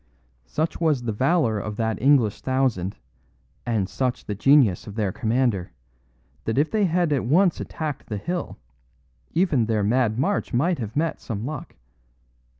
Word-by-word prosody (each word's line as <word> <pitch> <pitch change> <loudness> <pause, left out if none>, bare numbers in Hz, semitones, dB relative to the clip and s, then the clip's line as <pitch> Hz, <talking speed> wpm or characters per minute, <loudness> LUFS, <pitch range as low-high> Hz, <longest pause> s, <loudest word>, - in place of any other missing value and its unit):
"Such 160 - -2
was 150 -7 +2
the 115 - -1
valour 130 -1 +2
of 105 +1 -5
that 110 -3 -1
English 130 -6 +3
thousand, 130 -8 0 0.7
and 110 -5 0
such 125 +4 -2
the 105 - -3
genius 115 - +4
of 105 - -8
their 105 -4 0
commander, 110 - 0 0.7
that 110 - -1
if 150 +3 +2
they 215 -2 +2
had 170 -3 +1
at 135 - 0
once 175 +8 +3
attacked 155 -4 -5
the 105 - -2
hill, 175 - -4 0.8
even 160 - +2
their 110 -2 +1
mad 115 +1 +2
march 195 +3 0
might 165 +6 +1
have 110 -2 -5
met 160 +2 -1
some 110 -3 -4
luck. 150 -1 -6
125 Hz, 155 wpm, -24 LUFS, 110-155 Hz, 0.8 s, genius